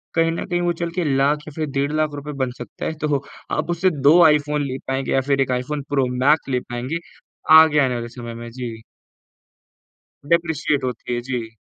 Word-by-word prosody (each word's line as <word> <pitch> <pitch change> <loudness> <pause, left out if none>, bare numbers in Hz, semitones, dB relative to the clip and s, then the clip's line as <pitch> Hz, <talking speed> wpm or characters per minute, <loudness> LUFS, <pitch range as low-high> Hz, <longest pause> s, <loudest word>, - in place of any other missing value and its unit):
कहीं 165 0 +3
न 165 - -3
कहीं 175 -1 -1
वो 175 0 +1
चल 170 - -1
के - - +1
लाख 145 +2 +2
या - - -7
फिर 155 -1 -1
डेढ़ 140 +1 +1
लाख 155 -1 0
रुपए 145 +1 -6
बन 125 - -2
सकता 120 -3 -7
है। - - -2
तो 145 -2 0 0.3
आप 155 +2 -1
उससे 175 +2 +2
2 155 +5 +6
आईफ़ोन 150 -1 +3
ले 130 0 -4
पाएँगे 135 0 -2
या 135 - +3
फिर 135 0 +1
एक 130 - 0
आईफ़ोन 140 +4 -2
प्रो 135 -2 +2 0.2
मैक्स 145 -1 +3
ले 125 -1 +1
पाएँगे, 125 +7 -4 0.6
आगे 155 -2 +5
आने 130 -3 +2
वाले 120 0 -4
समय 120 -1 -6
में। 120 0 -8
जी। 120 -2 -6 1.5
डेप्रिशिएट 160 -5 +1
होती 125 -1 -3
है, 120 - -1
जी। 120 -3 -5
140 Hz, 205 wpm, -21 LUFS, 125-155 Hz, 1.5 s, 2